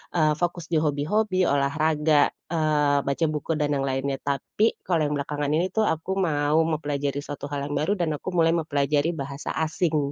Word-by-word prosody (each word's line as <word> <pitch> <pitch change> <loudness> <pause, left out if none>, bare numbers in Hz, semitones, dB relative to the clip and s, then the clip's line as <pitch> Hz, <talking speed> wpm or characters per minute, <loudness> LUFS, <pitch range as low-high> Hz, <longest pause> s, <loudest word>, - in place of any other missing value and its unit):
eee, 155 -3 +3
fokus 175 -1 -2
dihobi-hobi, 165 +6 +1
olahraga, 150 +1 +2 0.2
eee, 150 -3 +2
baca 140 +4 +1
buku 150 +2 -3
dan 150 -1 0
yang 135 -1 -1
lainnya. 135 +1 -1
Tapi, 145 +10 0
kalau 170 -3 +1
yang 145 - -1
belakangan 145 +1 -2
ini 170 +3 +2
tuh 220 - +1
aku 160 +4 -2
mau 150 -3 +2
mempelajari 145 -2 -2
suatu 145 -1 -6
hal 145 - -2
yang - - -2
baru 190 +7 +1
dan 175 -5 -1
aku - - -5
mulai 165 -1 +4
mempelajari 145 0 +1
bahasa 140 -1 -5
asing, 155 -3 0
150 Hz, 170 wpm, -25 LUFS, 145-165 Hz, 0.2 s, mulai